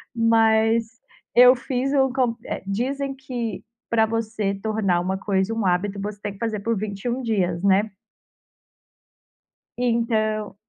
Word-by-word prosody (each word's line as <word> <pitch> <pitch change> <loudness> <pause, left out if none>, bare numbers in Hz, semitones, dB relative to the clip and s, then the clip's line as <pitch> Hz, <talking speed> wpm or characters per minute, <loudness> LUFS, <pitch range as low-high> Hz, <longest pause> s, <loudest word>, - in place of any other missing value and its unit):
Mas 225 0 +3 0.5
eu 250 +1 +8
fiz 260 +2 -2
um 265 -2 +3
co 250 -3 0
eh, - - -5
dizem 270 +7 -2
que 245 -5 -5 0.3
pra 225 -1 +3
você 220 -2 -2
tornar 195 -3 0
uma 190 +2 -2
coisa 190 +1 0
um 225 -3 -2
hábito, 195 +3 0
você 205 0 -5
tem 205 - -4
que 195 - -17
fazer 220 -3 -2
por 225 +1 -1
21 215 +5 -3
dias, 180 -7 0
né. 200 +2 +3 1.9
Então, 220 -4 0
220 Hz, 135 wpm, -23 LUFS, 200-235 Hz, 1.9 s, eu